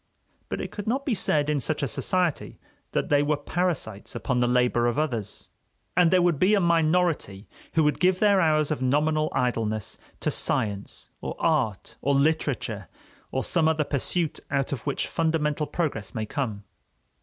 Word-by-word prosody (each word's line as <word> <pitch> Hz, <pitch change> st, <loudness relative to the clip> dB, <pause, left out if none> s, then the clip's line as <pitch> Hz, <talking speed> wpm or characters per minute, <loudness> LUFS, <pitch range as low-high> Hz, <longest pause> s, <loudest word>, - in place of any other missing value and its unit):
But -, -, -3 dB
it -, -, -5 dB
could 205 Hz, 0 st, -7 dB
not 265 Hz, +5 st, 0 dB
be 265 Hz, -, +1 dB
said, 150 Hz, -7 st, +1 dB
in 150 Hz, -1 st, +1 dB
such 155 Hz, +2 st, -1 dB
a -, -, +1 dB
society, 175 Hz, +6 st, -1 dB, 0.3 s
that -, -, -1 dB
they 145 Hz, -1 st, +4 dB
were 145 Hz, 0 st, +1 dB
parasites 145 Hz, -, -2 dB
upon 125 Hz, -2 st, -1 dB
the 120 Hz, -, +3 dB
labor 125 Hz, -1 st, +2 dB
of 120 Hz, -, 0 dB
others. 120 Hz, -10 st, -3 dB, 0.5 s
And 180 Hz, -2 st, +5 dB
there 180 Hz, 0 st, +4 dB
would 170 Hz, -5 st, +2 dB
be 195 Hz, +3 st, +4 dB
a -, -, +3 dB
minority 165 Hz, -, +1 dB, 0.3 s
who 160 Hz, -, +3 dB
would 150 Hz, -1 st, +1 dB
give 185 Hz, +1 st, +3 dB
their 200 Hz, -1 st, +4 dB
hours 155 Hz, -2 st, +2 dB
of 150 Hz, -, -2 dB
nominal 155 Hz, +4 st, +2 dB
idleness 110 Hz, -4 st, -1 dB, 0.2 s
to -, -, 0 dB
science 100 Hz, -2 st, -2 dB
or -, -, -4 dB
art 135 Hz, -, 0 dB
or 140 Hz, 0 st, +2 dB
literature, 155 Hz, +4 st, 0 dB, 0.4 s
or 130 Hz, -, -2 dB
some 165 Hz, -3 st, +1 dB
other 160 Hz, -1 st, +2 dB
pursuit 155 Hz, +4 st, -1 dB
out 140 Hz, -1 st, 0 dB
of 135 Hz, -5 st, -3 dB
which 140 Hz, -, 0 dB
fundamental 155 Hz, -2 st, 0 dB
progress 140 Hz, -, -3 dB
may 110 Hz, -1 st, -2 dB
come. 110 Hz, -4 st, -3 dB
150 Hz, 175 wpm, -26 LUFS, 125-165 Hz, 0.5 s, And